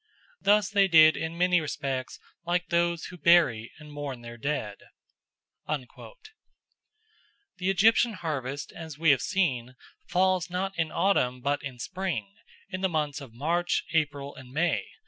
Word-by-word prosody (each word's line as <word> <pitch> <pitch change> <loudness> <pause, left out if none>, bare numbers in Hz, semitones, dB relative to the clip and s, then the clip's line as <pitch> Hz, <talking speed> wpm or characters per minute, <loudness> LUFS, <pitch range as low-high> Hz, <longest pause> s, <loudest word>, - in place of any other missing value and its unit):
Thus 205 -1 +4
they 200 -1 +3
did 155 -3 +7
in 160 +1 -4
many 180 -1 +3
respects 135 -3 -4 0.2
like 175 +1 -1
those 170 -1 +1
who 180 - -10
bury 145 -9 +4
and 150 -1 -13
mourn 140 -4 -5
their 120 0 -8
dead." 115 -5 -3 0.9
The 145 -4 -5 1.6
Egyptian 220 +5 +4
harvest, 145 -6 -4
as 160 -3 -9
we 160 -1 +4
have 135 - +3
seen, 130 - -1 0.3
falls 185 -1 +1
not 190 +2 -3
in 165 -2 -1
autumn 125 -11 +1
but 140 +3 -1
in 140 -3 -7
spring, 185 +8 -4 0.4
in 185 -1 -4
the 190 - +2
months 150 -3 -2
of 125 -5 -12
March, 170 +7 0
April, 145 -3 -1
and 130 -2 -13
May. 150 - 0
155 Hz, 145 wpm, -27 LUFS, 140-180 Hz, 1.6 s, did